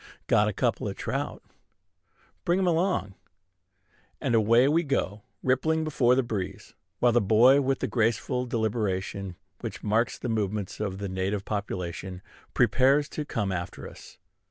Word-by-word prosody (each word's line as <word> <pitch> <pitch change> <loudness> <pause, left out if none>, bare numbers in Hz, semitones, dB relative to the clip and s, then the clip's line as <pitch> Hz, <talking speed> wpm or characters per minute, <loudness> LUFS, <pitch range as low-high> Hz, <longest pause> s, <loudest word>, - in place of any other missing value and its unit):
"Got - - +3
a - - +1
couple - - -1
o' - - -3
trout." - - -4 1.0
"Bring 175 -1 +2
'em 190 - +1
along." 170 - +1 1.1
And 130 -5 -1
away 115 +3 +5
we 160 +4 +3
go, 120 - -1 0.2
rippling 155 +5 +1
before 135 -5 +3
the 130 - +2
breeze; 105 -6 -5 0.2
while 120 - +4
the 120 - +3
boy, 120 +7 +5
with 135 0 0
the - - 0
graceful 125 +2 0
deliberation 100 -5 -2 0.2
which - - -6
marks 110 +2 +1
the - - -5
movements 105 -3 -2
of 100 -3 -3
the 100 0 -4
native 95 +2 -2
population, 95 -2 -4 0.3
prepares 130 +5 +3
to 150 - -4
come 105 -8 -2
after 90 -1 -5
us. - - -13
115 Hz, 150 wpm, -27 LUFS, 100-135 Hz, 1.1 s, away